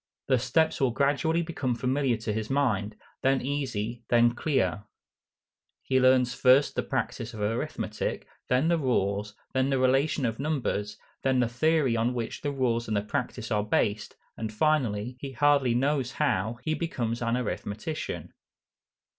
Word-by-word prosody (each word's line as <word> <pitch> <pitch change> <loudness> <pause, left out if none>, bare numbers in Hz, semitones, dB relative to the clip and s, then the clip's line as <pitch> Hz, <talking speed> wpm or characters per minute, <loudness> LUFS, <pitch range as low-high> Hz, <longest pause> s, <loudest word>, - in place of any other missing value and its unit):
The 130 -2 +4
steps 155 +6 +1
will 135 - +4
gradually 145 +6 +1
become 145 -7 -2
familiar 130 0 0
to 110 -1 -3
his 110 0 -3
mind, 110 -7 0 0.3
then 135 0 +3
easy, 120 -4 -3
then 120 0 +4
clear. 105 - 0 1.0
He 130 -1 +2
learns 130 -1 +4
first 130 +3 +4
the - - 0
practice 120 0 -3
of - - -8
arithmetic, 110 +3 -2 0.2
then 125 +5 +3
the 170 -1 +2
rules, 105 -6 0 0.2
then 130 +1 +2
the 135 - +2
relations 135 +2 +2
of 115 0 -2
numbers, 135 -8 -2 0.2
then 130 -1 +2
the 125 - +3
theory 135 +1 +2
on 115 +2 0
which 115 -2 -4
the 145 - -1
rules 120 -4 0
and 110 -1 0
the 100 - 0
practice 120 0 -3
are 105 -1 +2
based, 105 0 0 0.2
and 110 -1 -4
finally, 125 -3 0
he 135 0 -6
hardly 140 -3 +3
knows 135 0 0
how, 115 -6 0
he 155 - 0
becomes 120 -9 -2
an 115 +1 +1
arithmetician. 125 +6 -4
125 Hz, 155 wpm, -28 LUFS, 115-140 Hz, 1.0 s, The